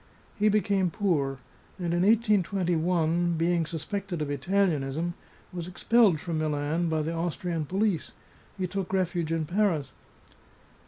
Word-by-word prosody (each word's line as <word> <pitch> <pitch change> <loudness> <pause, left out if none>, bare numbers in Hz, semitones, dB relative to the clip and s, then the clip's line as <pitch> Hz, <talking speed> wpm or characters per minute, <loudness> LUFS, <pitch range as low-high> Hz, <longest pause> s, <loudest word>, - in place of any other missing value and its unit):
He 210 0 +3
became 200 -3 +2
poor, 145 -9 0 0.4
and 175 -2 -2
in 175 - +1
1821, 180 -5 +2
being 165 0 +1
sus 160 -2 -5
pected 200 -5 -3
of 150 -1 -2
Italianism, 160 0 0 0.4
was 175 -1 -5
expelled 195 -1 +3
from 165 0 -3
Milan 155 +2 0
by 160 -1 0
the 160 +2 -2
Aus 165 0 -2
trian 170 -6 -3
police; 195 -2 0 0.5
he 185 - -1
took 190 +1 -4
refuge 180 -3 0
in 165 -1 0
Paris. 170 -6 0
175 Hz, 140 wpm, -28 LUFS, 160-195 Hz, 0.5 s, He